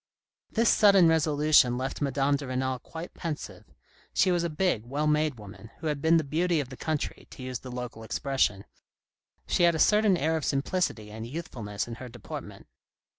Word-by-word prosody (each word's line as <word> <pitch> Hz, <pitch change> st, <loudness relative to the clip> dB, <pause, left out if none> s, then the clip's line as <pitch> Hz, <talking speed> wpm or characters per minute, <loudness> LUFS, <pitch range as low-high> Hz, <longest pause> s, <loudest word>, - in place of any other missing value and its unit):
This 230 Hz, +1 st, +1 dB
sudden 195 Hz, -5 st, +6 dB
resolution 150 Hz, -5 st, +4 dB
left 130 Hz, +3 st, -4 dB
Madame 140 Hz, 0 st, +1 dB
de 140 Hz, -1 st, -5 dB
Renal 130 Hz, 0 st, -1 dB
quite 165 Hz, +6 st, -9 dB
pensive. 160 Hz, -3 st, -6 dB, 0.5 s
She 185 Hz, -, +4 dB
was 175 Hz, -1 st, +1 dB
a 170 Hz, -, -1 dB
big, 155 Hz, -, 0 dB
well 140 Hz, +6 st, -2 dB
made 150 Hz, -2 st, +1 dB
woman, 105 Hz, +1 st, -11 dB
who 160 Hz, -, -10 dB
had 150 Hz, -2 st, -1 dB
been 160 Hz, +2 st, +5 dB
the 160 Hz, -, +1 dB
beauty 165 Hz, +4 st, +1 dB
of 135 Hz, -4 st, -3 dB
the 130 Hz, -, -8 dB
country, 155 Hz, +2 st, -3 dB
to 130 Hz, -, -10 dB
use 130 Hz, -1 st, -4 dB
the 130 Hz, -, -9 dB
local 125 Hz, -2 st, -6 dB
expression. 110 Hz, -4 st, 0 dB, 0.8 s
She -, -, 0 dB
had 170 Hz, -1 st, +5 dB
a -, -, 0 dB
certain 210 Hz, +2 st, +4 dB
air 160 Hz, +1 st, +1 dB
of 155 Hz, -, -4 dB
simplicity 135 Hz, -, -1 dB
and 110 Hz, +1 st, -7 dB
youthfulness 120 Hz, -9 st, -5 dB
in 120 Hz, -, -6 dB
her 130 Hz, -, -7 dB
deportment. 120 Hz, -2 st, -9 dB
145 Hz, 185 wpm, -28 LUFS, 125-165 Hz, 0.8 s, sudden